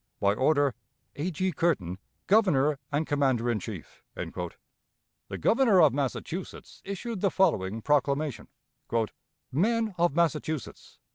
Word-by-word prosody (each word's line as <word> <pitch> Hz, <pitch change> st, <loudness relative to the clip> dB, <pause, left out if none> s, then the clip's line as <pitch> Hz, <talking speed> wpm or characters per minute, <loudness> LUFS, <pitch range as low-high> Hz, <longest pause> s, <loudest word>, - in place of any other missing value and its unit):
By 100 Hz, 0 st, +3 dB
order: 140 Hz, +2 st, +2 dB, 0.4 s
"A. 155 Hz, +6 st, -2 dB
G. 185 Hz, +2 st, -1 dB
CURTIN, 105 Hz, -, 0 dB, 0.3 s
"Governor 155 Hz, -9 st, +3 dB
and 150 Hz, +2 st, 0 dB
Commander 130 Hz, -5 st, +1 dB
in 110 Hz, -, -1 dB
Chief." 95 Hz, -, -9 dB
The -, -, -9 dB
Governor 230 Hz, -5 st, +4 dB
of 155 Hz, -5 st, +6 dB
Massachusetts 145 Hz, +6 st, -4 dB
issued 200 Hz, +1 st, -5 dB
the 195 Hz, -, +3 dB
following 110 Hz, -, +1 dB
proclamation: 145 Hz, -1 st, 0 dB, 1.1 s
"_Men 220 Hz, -, +1 dB
of 170 Hz, -4 st, +2 dB
Massachusetts! 160 Hz, -3 st, -2 dB
150 Hz, 115 wpm, -28 LUFS, 130-185 Hz, 1.1 s, of